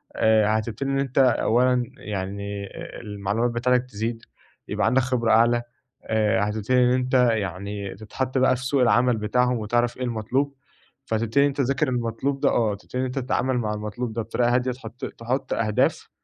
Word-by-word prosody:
آآ، 110 Hz, -1 st, +4 dB
هتبتدي 115 Hz, +5 st, -4 dB
إن 135 Hz, -, +1 dB
أنت 135 Hz, -2 st, -3 dB
أولًا 125 Hz, 0 st, +3 dB
يعني 100 Hz, 0 st, -5 dB, 0.3 s
المعلومات 105 Hz, +3 st, -1 dB
بتاعتك 125 Hz, +1 st, +1 dB
تزيد 115 Hz, 0 st, -4 dB, 0.4 s
يبقى -, -, -1 dB
عندك 125 Hz, +3 st, +3 dB
خبرة 125 Hz, -3 st, 0 dB
أعلى 120 Hz, +2 st, +4 dB, 0.4 s
آآ، 110 Hz, -2 st, +1 dB
هتبتدي 110 Hz, +4 st, 0 dB
إن 125 Hz, -, +4 dB
أنت 130 Hz, 0 st, -1 dB, 0.2 s
يعني 100 Hz, -1 st, -4 dB
تتحط 130 Hz, +6 st, -4 dB
بقى 130 Hz, 0 st, +4 dB
في 125 Hz, +1 st, -6 dB
سوق 135 Hz, +1 st, +1 dB
العمل 120 Hz, 0 st, +3 dB
بتاعهم 125 Hz, +3 st, +1 dB
وتعرف 120 Hz, +3 st, 0 dB
إيه 130 Hz, -, -4 dB
المطلوب، 125 Hz, +4 st, -1 dB, 0.5 s
فتبتدي 115 Hz, +4 st, +1 dB
إن -, -, +5 dB
أنت 140 Hz, -, -4 dB
تذاكر 135 Hz, +2 st, +1 dB
المطلوب 125 Hz, +3 st, -2 dB
ده، -, -, +3 dB
آه، 110 Hz, -3 st, +1 dB
تبتدي 125 Hz, +5 st, -7 dB
إن 130 Hz, -, +1 dB
أنت 130 Hz, +1 st, -3 dB
تتعامل 130 Hz, 0 st, 0 dB
مع 105 Hz, -3 st, -1 dB
المطلوب 105 Hz, +3 st, -4 dB
ده 115 Hz, -, -2 dB
بطريقة 120 Hz, +2 st, +1 dB
هادية 125 Hz, 0 st, +1 dB
تحط 125 Hz, +1 st, -8 dB
تحط 125 Hz, +4 st, -3 dB
أهداف 105 Hz, -2 st, 0 dB
120 Hz, 170 wpm, -24 LUFS, 110-125 Hz, 0.5 s, إن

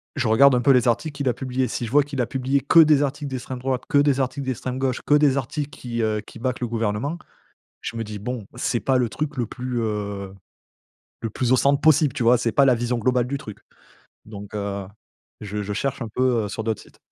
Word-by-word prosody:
je 125 Hz, -6 st, 0 dB
regarde 135 Hz, +3 st, +6 dB
un 125 Hz, -, +2 dB
peu 135 Hz, +3 st, +5 dB
les 125 Hz, -2 st, +4 dB
articles 145 Hz, +6 st, 0 dB
qu'il 140 Hz, -2 st, -3 dB
a 125 Hz, -, +3 dB
publiés. 130 Hz, -1 st, -2 dB
Si 120 Hz, -, -3 dB
je 115 Hz, -, -7 dB
vois 145 Hz, 0 st, +5 dB
qu'il 140 Hz, -3 st, -3 dB
a -, -, +1 dB
publié 135 Hz, +3 st, 0 dB
que 155 Hz, +6 st, +5 dB
des 150 Hz, -2 st, +6 dB
articles 145 Hz, +1 st, -3 dB
d'extrême 130 Hz, 0 st, -5 dB
droite, 130 Hz, 0 st, -2 dB
que 145 Hz, -, +3 dB
des 140 Hz, -2 st, +3 dB
articles 135 Hz, +1 st, -3 dB
d'extrême 130 Hz, 0 st, -3 dB
gauche, 130 Hz, -2 st, -1 dB
que 145 Hz, -, +3 dB
des 145 Hz, -2 st, +4 dB
articles 140 Hz, +2 st, -3 dB
qui, 120 Hz, -3 st, -5 dB
heu, 110 Hz, -1 st, 0 dB
qui -, -, -13 dB
back 125 Hz, +1 st, -2 dB
le 120 Hz, -, -1 dB
gouvernement, 115 Hz, +7 st, -2 dB, 0.6 s
je 115 Hz, -, -6 dB
me 115 Hz, -, -2 dB
dis: 105 Hz, -1 st, -7 dB
«Bon, 115 Hz, -1 st, -5 dB
c'est 120 Hz, -1 st, -1 dB
pas 130 Hz, -1 st, +2 dB
le 120 Hz, -2 st, +1 dB
truc 150 Hz, +4 st, -4 dB
le 120 Hz, -, 0 dB
plus, 125 Hz, 0 st, -4 dB
heu, 100 Hz, -3 st, -3 dB, 0.9 s
le 115 Hz, -, -3 dB
plus 125 Hz, +3 st, 0 dB
au -, -, +7 dB
centre 140 Hz, +2 st, +3 dB
possible». 155 Hz, -2 st, +4 dB
Tu 120 Hz, -, -2 dB
vois? 120 Hz, +1 st, +5 dB
C'est 115 Hz, -1 st, -1 dB
pas 140 Hz, -, +4 dB
la 130 Hz, -, +5 dB
vision 120 Hz, +1 st, -1 dB
globale 125 Hz, +1 st, +1 dB
du 140 Hz, +1 st, -2 dB
truc. 105 Hz, -6 st, -10 dB, 0.7 s
Donc, 105 Hz, -1 st, -9 dB
heu, 100 Hz, -2 st, -3 dB, 0.5 s
je 105 Hz, 0 st, -4 dB
je 105 Hz, 0 st, -4 dB
cherche 135 Hz, +4 st, -2 dB
un 115 Hz, -, -3 dB
peu, 120 Hz, -1 st, +1 dB
heu, -, -, -5 dB
sur 110 Hz, +2 st, -4 dB
d'autres 110 Hz, -2 st, -2 dB
sites. -, -, -19 dB
125 Hz, 245 wpm, -23 LUFS, 110-135 Hz, 0.9 s, au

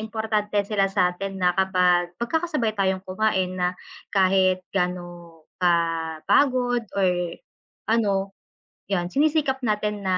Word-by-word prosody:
importante 220 Hz, -1 st, -2 dB
sila 200 Hz, -1 st, +1 dB
sa 180 Hz, -2 st, +2 dB
atin 195 Hz, +2 st, -6 dB
na 180 Hz, 0 st, +4 dB
kapag 180 Hz, -2 st, +2 dB
mag-kaka-sabay 300 Hz, -2 st, -1 dB
tayong 190 Hz, -2 st, 0 dB
kumain 190 Hz, -1 st, 0 dB
na 180 Hz, -, +2 dB, 0.5 s
kahit 185 Hz, -1 st, +3 dB
gaano 175 Hz, -3 st, -4 dB, 0.2 s
ka 175 Hz, -1 st, +4 dB, 0.5 s
pagod 245 Hz, -4 st, +2 dB
or 190 Hz, -2 st, +3 dB, 0.8 s
ano 200 Hz, -4 st, +1 dB, 0.6 s
'yun 175 Hz, -3 st, 0 dB
sini-sikap 280 Hz, -, +1 dB
natin 210 Hz, -2 st, -1 dB
na 185 Hz, -1 st, +1 dB
195 Hz, 120 wpm, -24 LUFS, 180-220 Hz, 0.8 s, na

